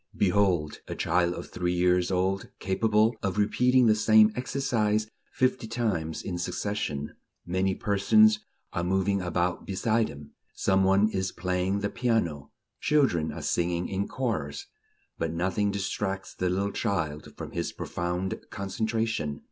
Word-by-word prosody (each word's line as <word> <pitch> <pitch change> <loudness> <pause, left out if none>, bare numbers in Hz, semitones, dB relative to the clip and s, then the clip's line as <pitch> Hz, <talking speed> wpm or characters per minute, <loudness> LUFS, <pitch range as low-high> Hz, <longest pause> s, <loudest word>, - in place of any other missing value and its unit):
Behold 90 -6 +2
a - - -4
child 85 +1 +1
of - - -8
three 90 0 -1
years 90 0 +3
old 95 +1 0
capable 110 +4 +2
of 100 0 -2
repeating 125 +4 +3
the 110 - +6
same 110 0 +5
exercise 115 -5 0 0.2
fifty 130 -2 0
times 105 -9 -2
in 90 -2 -4
succession; 85 -7 -3 0.3
many 95 +2 0
persons 105 +2 +4 0.3
are 85 - -1
moving 95 +2 +1
about 90 0 -1
beside 110 +3 +1
him; 70 -1 -11 0.2
some 95 0 +2
one 95 +2 +4
is 95 -3 -2
playing 90 +2 -1
the 100 - 0
piano; 100 - 0 0.3
children 130 - +2
are - - -7
singing 85 0 0
in 100 +1 -2
chorus; 130 - -3 0.5
but 80 - -1
nothing 95 +4 0
distracts 95 -1 -3
the 90 - -1
little 100 +2 0
child 80 -9 -2
from - - -7
his - - -2
profound 90 +2 -3
concentration. 110 -6 -2
95 Hz, 140 wpm, -27 LUFS, 90-110 Hz, 0.5 s, the